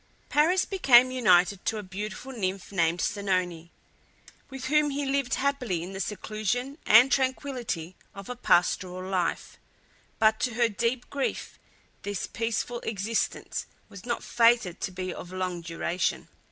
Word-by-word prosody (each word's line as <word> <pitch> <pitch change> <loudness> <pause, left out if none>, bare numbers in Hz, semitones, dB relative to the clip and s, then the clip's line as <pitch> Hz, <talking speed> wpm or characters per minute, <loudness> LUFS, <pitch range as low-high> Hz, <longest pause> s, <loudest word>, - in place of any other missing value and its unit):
Paris 330 +6 +3
became 255 -10 +5
united 195 -6 +3
to 220 - -1
a 210 - -5
beautiful 205 +6 -6
nymph 195 -6 -3
named 170 -2 +1
Oenone, 185 -5 -1 0.8
with 265 -1 -7
whom 300 +1 +3
he 285 0 -2
lived 270 -1 0
happily 250 -11 -1
in 185 +2 -7
the 195 - -6
seclusion 215 - -3
and 240 +5 +7
tranquillity 255 - -1 0.2
of 195 -1 -9
a 250 - -5
pastoral 185 -4 +1
life; 185 -3 -2 0.6
but 220 0 +3
to 245 -3 -1
her 235 0 +3
deep 235 +3 -2
grief 280 -1 -3 0.4
this 205 -2 -3
peaceful 230 +1 -2
existence 220 +1 -2 0.2
was 200 - -11
not 240 0 -3
fated 230 -6 +3
to 195 - -2
be 185 0 -4
of 180 - -9
long 185 -2 -3
duration. 170 +2 -2
215 Hz, 140 wpm, -27 LUFS, 185-255 Hz, 0.8 s, and